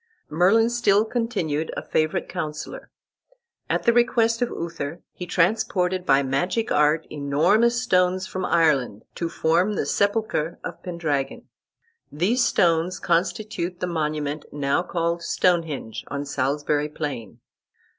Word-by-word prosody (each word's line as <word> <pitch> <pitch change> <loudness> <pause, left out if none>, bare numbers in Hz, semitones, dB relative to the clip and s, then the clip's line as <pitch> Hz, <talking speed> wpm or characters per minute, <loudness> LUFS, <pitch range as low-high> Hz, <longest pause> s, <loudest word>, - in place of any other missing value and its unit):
Merlin 200 +9 +4
still 215 -3 +3
continued 195 -11 -2
a - - -3
favorite 155 0 0
counsellor. 150 0 -6 0.8
At - - 0
the 235 - +4
request 235 -1 +2
of 245 - +1
Uther 165 -1 -5
he 180 - -7
transported 185 -1 +1
by 135 +1 +4
magic 175 - -1
art 150 +2 +3
enormous 175 +12 +2
stones 185 -4 +2
from 185 0 -5
Ireland, 145 - +2
to 170 - -3
form 170 +7 +1
the - - -1
sepulchre 200 -6 0
of - - -7
Pendragon. 150 -6 -2 0.7
These 200 - +1
stones 175 -4 +2
constitute 175 0 -1
the - - -1
monument 155 -3 -2
now 140 +2 0
called 170 -1 -2
Stonehenge, 165 -11 0
on 140 0 -4
Salisbury 145 +2 -1
plain. 140 -9 -6
170 Hz, 125 wpm, -24 LUFS, 150-195 Hz, 0.8 s, Merlin